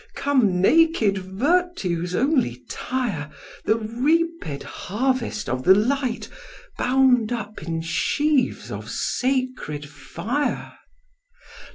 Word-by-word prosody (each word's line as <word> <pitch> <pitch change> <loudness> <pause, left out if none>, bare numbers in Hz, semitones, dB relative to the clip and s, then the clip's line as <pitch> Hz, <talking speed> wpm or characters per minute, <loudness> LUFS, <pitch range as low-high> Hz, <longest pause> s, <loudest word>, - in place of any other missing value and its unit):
Come, 245 -11 +2
naked 230 - +4
Virtue's 190 - 0
only 245 - +1
tire, 220 - -3 0.4
The 220 - +3
reaped 250 - 0
harvest 235 +1 -2
of 130 +1 -2
the 190 - +7
light, 250 +3 0 0.5
Bound 250 -3 +3
up 215 -3 -4
in 165 0 -3
sheaves 285 - 0
of - - -6
sacred 255 - -2
fire! 175 - -3
235 Hz, 90 wpm, -23 LUFS, 180-270 Hz, 0.5 s, the